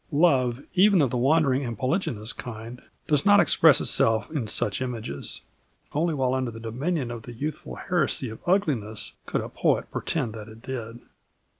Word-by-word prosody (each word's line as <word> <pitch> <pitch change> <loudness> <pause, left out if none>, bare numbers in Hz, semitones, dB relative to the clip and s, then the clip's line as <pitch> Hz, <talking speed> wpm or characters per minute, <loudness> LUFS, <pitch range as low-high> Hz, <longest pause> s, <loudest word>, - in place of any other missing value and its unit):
Love, 140 -5 +2
even 195 +1 +5
of 135 -6 +2
the 125 - -1
wandering 140 +1 +3
and 120 -3 -4
polygynous 130 - -1
kind, 120 0 -8 0.3
does 150 -2 +2
not 205 0 +6
express 160 -6 +6
itself 110 -1 +2
in 140 -8 -2
such 105 +2 0
images. 115 - -4 0.5
Only 160 +2 0
while 130 -2 +1
under 130 -2 -1
the 115 -1 -9
dominion 125 +4 -2
of 120 -1 -6
the 120 +2 -10
youthful 150 +6 -5
heresy 155 -8 0
of 110 - -9
ugliness 135 - 0 0.2
could - - -1
a - - -5
poet - - 0
pretend 130 -9 -2
that 110 -1 -8
it 110 +1 -14
did. 120 -2 -6
130 Hz, 170 wpm, -25 LUFS, 115-155 Hz, 0.5 s, not